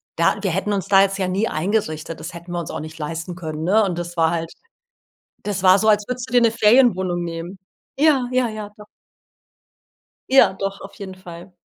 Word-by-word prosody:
da 165 Hz, +4 st, +2 dB
wir 195 Hz, -3 st, -1 dB
hätten 195 Hz, +4 st, -1 dB
uns 195 Hz, -1 st, -2 dB
da 195 Hz, -1 st, +6 dB
jetzt 195 Hz, 0 st, +1 dB
ja 190 Hz, -, 0 dB
nie 195 Hz, +5 st, 0 dB
eingerichtet. 165 Hz, -3 st, -2 dB
Das 155 Hz, +2 st, -7 dB
hätten 170 Hz, +1 st, -10 dB
wir 175 Hz, -, -2 dB
uns 170 Hz, -, -6 dB
auch -, -, -5 dB
nicht 155 Hz, 0 st, -9 dB
leisten 165 Hz, +3 st, -5 dB
können, 160 Hz, -3 st, -6 dB
ne? 205 Hz, +6 st, +3 dB
Und 180 Hz, -3 st, -3 dB
das 175 Hz, 0 st, -6 dB
war 165 Hz, 0 st, +3 dB
halt 165 Hz, -1 st, -3 dB, 0.9 s
das 200 Hz, -2 st, -3 dB
war 185 Hz, 0 st, +7 dB
so, 220 Hz, -, +1 dB
als 210 Hz, -1 st, +3 dB
würdest 250 Hz, 0 st, -5 dB
du -, -, -6 dB
dir 245 Hz, -, +6 dB
'ne 230 Hz, -1 st, +4 dB
Ferienwohnung 210 Hz, -7 st, +3 dB
nehmen. 170 Hz, +3 st, -6 dB, 0.4 s
Ja, 285 Hz, -4 st, +3 dB
ja, 250 Hz, -1 st, +2 dB
ja, 215 Hz, -2 st, -7 dB
doch. 210 Hz, -, -12 dB, 1.5 s
Ja, 270 Hz, -7 st, +6 dB
doch, 195 Hz, +1 st, -4 dB
auf 195 Hz, -, -10 dB
jeden 190 Hz, -2 st, -8 dB
Fall. 180 Hz, 0 st, -12 dB
190 Hz, 210 wpm, -21 LUFS, 170-210 Hz, 1.5 s, war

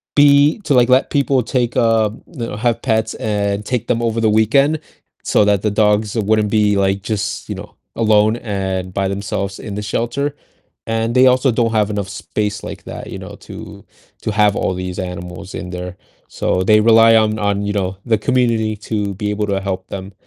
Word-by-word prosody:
be 145 Hz, +3 st, +5 dB
to, 150 Hz, -, +1 dB
like, 125 Hz, -2 st, +5 dB
let 130 Hz, +1 st, +3 dB
people 140 Hz, -3 st, +1 dB
take, 120 Hz, 0 st, -1 dB
um 110 Hz, -2 st, +1 dB
you 130 Hz, -9 st, -6 dB
know, -, -, -6 dB
have 115 Hz, +2 st, 0 dB
pets, 110 Hz, -3 st, 0 dB
and 105 Hz, -1 st, -2 dB
take 120 Hz, -2 st, -2 dB
them 115 Hz, -, 0 dB
over 115 Hz, -1 st, 0 dB
the 110 Hz, -, +3 dB
weekend, 135 Hz, +8 st, +3 dB, 0.5 s
so -, -, +3 dB
that 100 Hz, -2 st, +2 dB
the 105 Hz, -, 0 dB
dogs 105 Hz, 0 st, +1 dB
wouldn't 110 Hz, -1 st, +1 dB
be, 105 Hz, -1 st, +2 dB
like, 95 Hz, 0 st, +1 dB
just, 105 Hz, 0 st, -3 dB
you -, -, -3 dB
know, -, -, -10 dB, 0.2 s
alone 110 Hz, 0 st, +3 dB
and 95 Hz, -4 st, -3 dB
by 95 Hz, 0 st, 0 dB
themselves 100 Hz, 0 st, -3 dB
in 105 Hz, -3 st, -6 dB
the 105 Hz, -, -3 dB
shelter, 120 Hz, +7 st, -2 dB, 0.5 s
and 115 Hz, +1 st, -1 dB
they 130 Hz, +1 st, +6 dB
also 130 Hz, +1 st, +3 dB
don't 115 Hz, 0 st, +1 dB
have 105 Hz, -2 st, +2 dB
enough 100 Hz, -2 st, -3 dB
space 105 Hz, 0 st, -3 dB
like -, -, -8 dB
that, -, -, -8 dB
you -, -, -7 dB
know, -, -, -9 dB
to -, -, -11 dB, 0.4 s
to -, -, -2 dB
have 105 Hz, -1 st, +3 dB
all -, -, 0 dB
these 90 Hz, 0 st, -5 dB
animals 90 Hz, 0 st, -7 dB
in 90 Hz, -, -6 dB
there, 90 Hz, +1 st, -6 dB, 0.3 s
so 90 Hz, -, -1 dB
they 105 Hz, +3 st, +5 dB
rely 115 Hz, 0 st, +6 dB
on 110 Hz, -1 st, +3 dB
on, 100 Hz, -1 st, 0 dB
you 105 Hz, -, -1 dB
know, 95 Hz, -2 st, -2 dB
the 115 Hz, -3 st, +2 dB
community 115 Hz, -2 st, +1 dB
to 105 Hz, -1 st, -3 dB
be 105 Hz, +1 st, -3 dB
able 105 Hz, 0 st, -1 dB
to 100 Hz, -1 st, 0 dB
help 95 Hz, -1 st, -4 dB
them, 95 Hz, 0 st, -7 dB
105 Hz, 200 wpm, -18 LUFS, 100-115 Hz, 0.5 s, they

